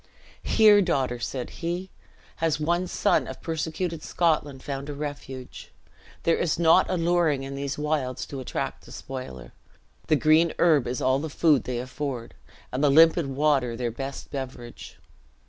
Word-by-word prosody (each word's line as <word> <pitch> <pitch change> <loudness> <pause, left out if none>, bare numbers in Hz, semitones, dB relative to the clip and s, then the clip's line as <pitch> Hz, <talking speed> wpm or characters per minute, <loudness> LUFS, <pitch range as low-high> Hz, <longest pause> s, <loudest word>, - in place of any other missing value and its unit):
"Here, 210 -2 +5
daughter," 135 -9 0
said 125 +1 -4
he, 175 +2 -3 0.5
"has 160 -2 0
one 175 +4 0
son - - +1
of - - -8
persecuted 165 +1 -3
Scotland 150 -6 0
found 140 0 -5
a 145 - -5
refuge. 140 -3 -7 0.5
There 165 - +3
is 170 - 0
naught 170 +2 +5
alluring 170 -5 +1
in 135 0 -6
these 140 0 -4
wilds 150 -4 -2
to 140 - -7
attract 130 - -4
the - - -14
spoiler. 130 - -8 0.5
The 155 - +4
green 155 +2 +4
herb 155 -7 +4
is 125 0 -3
all 130 +1 +3
the 160 +2 -4
food 150 -2 +3
they 125 -1 -3
afford, 125 -1 -5 0.4
and 130 +3 -2
the 145 - +5
limpid 165 +1 +5
water 135 -4 +1
their 120 -1 -2
best 135 +3 -7
beverage." 130 -4 -7
145 Hz, 155 wpm, -26 LUFS, 130-165 Hz, 0.5 s, Here